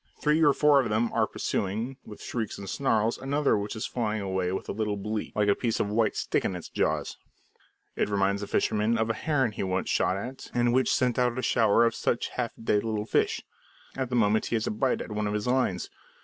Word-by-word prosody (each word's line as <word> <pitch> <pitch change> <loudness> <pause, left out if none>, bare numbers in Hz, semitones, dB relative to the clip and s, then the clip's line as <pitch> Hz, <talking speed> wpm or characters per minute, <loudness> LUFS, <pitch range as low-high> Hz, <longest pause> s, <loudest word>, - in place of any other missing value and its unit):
Three 150 +1 +2
or 145 - +7
four 145 0 +5
of 120 - -3
them 110 +2 0
are - - +2
pursuing, 110 +7 -2
with 105 - -11
shrieks 110 -4 -3
and 100 - -8
snarls, 115 -2 +1
another 140 +2 +1
which 105 +2 -3
is 110 - -3
flying 110 -3 -2
away 95 -2 -1
with 95 - -4
a - - -2
little 105 -1 -2
bleak, 105 +2 -4
like 105 -1 +2
a 100 - +5
piece 115 +1 -1
of 100 - 0
white 110 -1 +1
stick - - 0
in 95 - -1
its 90 - -7
jaws. - - -1 0.8
It - - 0
reminds 100 0 +1
the 100 - -4
fisherman 110 +2 +1
of 110 0 +1
a - - -1
heron 135 -6 0
he 105 - -5
once 95 -1 -1
shot 95 - +2
at, 125 +6 -7
and 120 0 +2
which 130 +1 +3
sent 125 -2 +1
out 125 0 +1
a 130 - -2
shower 115 0 +4
of 115 - +2
such 120 - -1
half 120 -2 -3
dead 105 -2 0
little 110 -2 -2
fish. - - +1 0.5
At 130 -2 -2
that 125 - -1
moment 110 -2 +2
he - - -1
has 110 - 0
a - - -1
bite 125 +5 0
at - - -7
one 105 0 -1
of 105 - -1
his 105 - -2
lines. 125 -8 0
110 Hz, 235 wpm, -27 LUFS, 105-125 Hz, 0.8 s, or